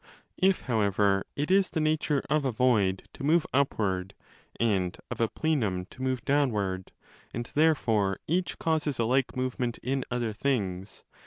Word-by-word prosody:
If, 190 Hz, 0 st, +3 dB
however, 100 Hz, -4 st, +1 dB
it 150 Hz, +5 st, -1 dB
is 195 Hz, 0 st, +4 dB
the 160 Hz, -, -2 dB
nature 155 Hz, -2 st, +1 dB
of 150 Hz, +1 st, +1 dB
a 135 Hz, -, 0 dB
void 110 Hz, -6 st, +2 dB
to -, -, -9 dB
move 155 Hz, +3 st, +3 dB
upward 100 Hz, -9 st, 0 dB, 0.4 s
and 95 Hz, -6 st, +1 dB
of -, -, -3 dB
a 115 Hz, -, +4 dB
plenum 110 Hz, -, -1 dB
to 130 Hz, -, -11 dB
move 130 Hz, -1 st, -1 dB
downward, 105 Hz, -10 st, 0 dB, 0.4 s
and 120 Hz, +1 st, -3 dB
therefore 115 Hz, -11 st, +2 dB
each 175 Hz, +3 st, -1 dB
causes 155 Hz, -4 st, 0 dB
a 115 Hz, -, +1 dB
like 130 Hz, +2 st, +1 dB
movement 125 Hz, -2 st, -2 dB
in 135 Hz, +1 st, -1 dB
other 120 Hz, -3 st, -1 dB
things 100 Hz, -6 st, -2 dB
125 Hz, 155 wpm, -28 LUFS, 100-145 Hz, 0.4 s, is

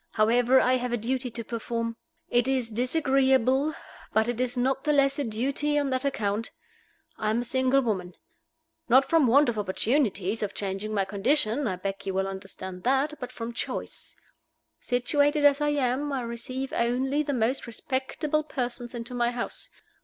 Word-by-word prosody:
However, 240 Hz, +4 st, +4 dB
I 255 Hz, 0 st, +3 dB
have 250 Hz, -1 st, -3 dB
a 240 Hz, -, +1 dB
duty 250 Hz, +3 st, -2 dB
to 235 Hz, 0 st, -6 dB
perform. 230 Hz, 0 st, -3 dB, 0.3 s
It 240 Hz, -5 st, +2 dB
is 255 Hz, -4 st, 0 dB
disagreeable, 265 Hz, +2 st, +2 dB, 0.4 s
but 220 Hz, +1 st, +2 dB
it 240 Hz, 0 st, -1 dB
is 255 Hz, 0 st, -1 dB
not 265 Hz, +2 st, 0 dB
the 300 Hz, -, +2 dB
less 275 Hz, 0 st, +3 dB
a -, -, +1 dB
duty 275 Hz, +6 st, -1 dB
on 285 Hz, -2 st, 0 dB
that 260 Hz, +1 st, 0 dB
account. 220 Hz, -5 st, -1 dB, 0.7 s
I 215 Hz, -, 0 dB
am 225 Hz, +2 st, +1 dB
a -, -, -3 dB
single 260 Hz, +2 st, +2 dB
woman; 190 Hz, -7 st, -2 dB, 0.7 s
not 260 Hz, +3 st, +6 dB
from 325 Hz, -5 st, +4 dB
want 280 Hz, +5 st, +5 dB
of 230 Hz, -3 st, -1 dB
opportunities 210 Hz, -1 st, 0 dB
of 205 Hz, -2 st, -3 dB
changing 195 Hz, +1 st, -3 dB
my 200 Hz, -2 st, +1 dB
condition 230 Hz, +6 st, +1 dB
I 190 Hz, -, -1 dB
beg 195 Hz, +2 st, -5 dB
you 190 Hz, -, -2 dB
will 190 Hz, 0 st, +1 dB
understand 190 Hz, -1 st, -7 dB
that 270 Hz, +6 st, +1 dB
but 250 Hz, -2 st, -6 dB
from 235 Hz, -1 st, -6 dB
choice. -, -, -5 dB, 0.6 s
Situated 290 Hz, +4 st, +1 dB
as 285 Hz, 0 st, +5 dB
I 295 Hz, -, +2 dB
am, 285 Hz, 0 st, 0 dB
I 270 Hz, -2 st, -1 dB
receive 255 Hz, +3 st, -5 dB
only 260 Hz, +5 st, +1 dB
the 290 Hz, -1 st, -2 dB
most 245 Hz, +1 st, 0 dB
respectable 270 Hz, +5 st, -2 dB
persons 245 Hz, -4 st, -4 dB
into 235 Hz, +1 st, -6 dB
my 240 Hz, -1 st, +1 dB
house. 240 Hz, -1 st, -5 dB
245 Hz, 175 wpm, -27 LUFS, 225-270 Hz, 0.7 s, not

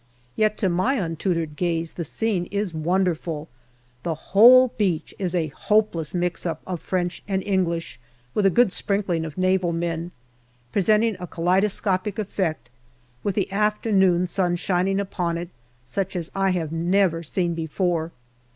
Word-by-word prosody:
Yet 215 Hz, -1 st, +1 dB
to 195 Hz, -, +1 dB
my 185 Hz, +10 st, +1 dB
untutored 165 Hz, -, -2 dB
gaze 165 Hz, -1 st, -1 dB
the 170 Hz, -, -4 dB
scene 185 Hz, +2 st, -1 dB
is 200 Hz, -3 st, -2 dB
wonderful. 165 Hz, -2 st, -1 dB, 0.5 s
The 165 Hz, +2 st, -2 dB
whole 245 Hz, +10 st, +7 dB
beach 190 Hz, -8 st, -1 dB
is 185 Hz, -2 st, -2 dB
a 160 Hz, -3 st, 0 dB
hopeless 180 Hz, -1 st, 0 dB
mix 175 Hz, -1 st, -1 dB
up 165 Hz, -3 st, -3 dB
of 180 Hz, -3 st, -4 dB
French 180 Hz, -1 st, -2 dB
and 190 Hz, -2 st, -1 dB
English, 175 Hz, -7 st, -1 dB, 0.3 s
with 205 Hz, -2 st, +3 dB
a -, -, +5 dB
good 235 Hz, +2 st, +4 dB
sprinkling 190 Hz, -6 st, -1 dB
of 155 Hz, 0 st, -8 dB
Naval 185 Hz, -1 st, +2 dB
men 170 Hz, 0 st, -3 dB, 0.6 s
presenting 215 Hz, -, +2 dB
a 180 Hz, -, -6 dB
kaleido 180 Hz, +5 st, +2 dB
scopic 195 Hz, 0 st, -1 dB
effect, 180 Hz, -, -2 dB, 0.5 s
with 200 Hz, -3 st, -2 dB
the 195 Hz, -2 st, -1 dB
afternoon 200 Hz, -3 st, +2 dB
sun 180 Hz, -1 st, 0 dB
shining 185 Hz, +2 st, 0 dB
upon 175 Hz, -4 st, -2 dB
it, 170 Hz, 0 st, -5 dB, 0.4 s
such 190 Hz, +12 st, -2 dB
as 170 Hz, -2 st, -3 dB
I 195 Hz, 0 st, +1 dB
have 170 Hz, -4 st, -1 dB
never 170 Hz, +1 st, +1 dB
seen 170 Hz, +1 st, -1 dB
before. 165 Hz, 0 st, -1 dB
180 Hz, 150 wpm, -24 LUFS, 165-195 Hz, 0.6 s, whole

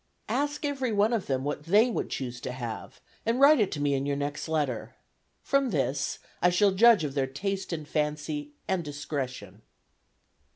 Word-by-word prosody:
Ask 290 Hz, +1 st, -1 dB
everyone 245 Hz, -6 st, +1 dB
of 225 Hz, -5 st, -1 dB
them 130 Hz, -1 st, 0 dB
what 145 Hz, +1 st, -3 dB
they 210 Hz, +8 st, +4 dB
would -, -, -2 dB
choose 125 Hz, -2 st, -4 dB
to -, -, -4 dB
have, 120 Hz, -3 st, -6 dB, 0.2 s
and 230 Hz, +3 st, 0 dB
write 285 Hz, +1 st, +7 dB
it 205 Hz, -3 st, +2 dB
to 145 Hz, -, -4 dB
me 145 Hz, -1 st, +1 dB
in 135 Hz, 0 st, -1 dB
your 140 Hz, -, 0 dB
next 145 Hz, +2 st, -3 dB
letter. 130 Hz, -7 st, -2 dB, 0.5 s
From 275 Hz, -2 st, +2 dB
this 140 Hz, -, -1 dB, 0.2 s
I 180 Hz, -, +5 dB
shall 195 Hz, +3 st, +4 dB
judge 215 Hz, -1 st, +6 dB
of 145 Hz, -3 st, -3 dB
their 135 Hz, -2 st, 0 dB
taste 190 Hz, +9 st, -3 dB
and 155 Hz, -3 st, -4 dB
fancy 150 Hz, -1 st, -2 dB
and 190 Hz, -2 st, 0 dB
discretion." 145 Hz, -3 st, -5 dB
150 Hz, 175 wpm, -28 LUFS, 140-210 Hz, 0.5 s, write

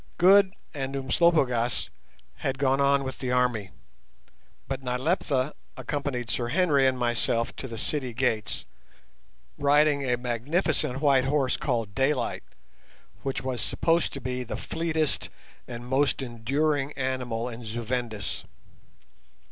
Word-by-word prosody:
Good 190 Hz, +1 st, +6 dB, 0.2 s
and 135 Hz, -1 st, -3 dB
Umslopogaas 130 Hz, -4 st, +2 dB, 0.5 s
had 135 Hz, -1 st, -2 dB
gone 135 Hz, 0 st, +2 dB
on 140 Hz, 0 st, +4 dB
with 130 Hz, 0 st, -5 dB
the 125 Hz, -2 st, -2 dB
army, 125 Hz, -6 st, +1 dB, 1.0 s
but 135 Hz, 0 st, -3 dB
Nyleptha 130 Hz, +1 st, 0 dB, 0.2 s
accompanied 135 Hz, -6 st, -2 dB
Sir 120 Hz, +2 st, 0 dB
Henry 145 Hz, -2 st, +3 dB
and 130 Hz, -1 st, +1 dB
myself 120 Hz, 0 st, 0 dB
to 130 Hz, -, -5 dB
the 115 Hz, -2 st, -7 dB
city 130 Hz, +2 st, -2 dB
gates, 115 Hz, -4 st, -1 dB, 0.9 s
riding 145 Hz, 0 st, +4 dB
a 125 Hz, -2 st, +1 dB
magnificent 130 Hz, -, 0 dB
white 135 Hz, -3 st, +4 dB
horse 135 Hz, -2 st, +2 dB
called 115 Hz, -6 st, -1 dB
Daylight, 135 Hz, +5 st, 0 dB, 0.8 s
which 135 Hz, -2 st, -3 dB
was 130 Hz, -2 st, -2 dB
supposed 165 Hz, 0 st, +1 dB
to 140 Hz, -, -4 dB
be 125 Hz, 0 st, -3 dB
the 120 Hz, -, -5 dB
fleetest 160 Hz, -2 st, -1 dB, 0.4 s
and 120 Hz, 0 st, -7 dB
most 135 Hz, +2 st, +1 dB
enduring 135 Hz, +4 st, 0 dB
animal 125 Hz, -3 st, -2 dB
in 120 Hz, 0 st, -7 dB
Zu 115 Hz, +2 st, -4 dB
Vendis. 115 Hz, -4 st, -3 dB
130 Hz, 125 wpm, -27 LUFS, 120-145 Hz, 1.0 s, Good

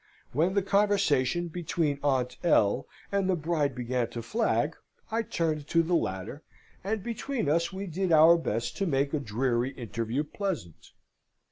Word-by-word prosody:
When 170 Hz, +8 st, +1 dB
the 200 Hz, -, +2 dB
conversation 190 Hz, -6 st, +2 dB
between 160 Hz, -3 st, -1 dB
Aunt 130 Hz, -3 st, 0 dB
L. 105 Hz, -12 st, +3 dB, 0.2 s
and 200 Hz, -1 st, +1 dB
the 185 Hz, -, +3 dB
bride 155 Hz, -4 st, 0 dB
began 125 Hz, -1 st, -1 dB
to 115 Hz, -, -6 dB
flag, 225 Hz, -, 0 dB, 0.4 s
I 225 Hz, +1 st, +1 dB
turned 160 Hz, -8 st, -2 dB
to 165 Hz, +1 st, +3 dB
the 170 Hz, +2 st, -1 dB
latter, 95 Hz, -, -2 dB, 0.4 s
and 205 Hz, +1 st, -2 dB
between 240 Hz, -, -3 dB
us 170 Hz, +4 st, +1 dB
we 195 Hz, +1 st, -5 dB
did 185 Hz, +1 st, -2 dB
our 165 Hz, +2 st, +7 dB
best 120 Hz, -7 st, -2 dB
to 195 Hz, -, 0 dB
make 140 Hz, -1 st, +1 dB
a 155 Hz, -, +1 dB
dreary 125 Hz, +1 st, -1 dB
interview 115 Hz, +2 st, -3 dB
pleasant. 160 Hz, -, -5 dB
155 Hz, 155 wpm, -28 LUFS, 130-190 Hz, 0.4 s, our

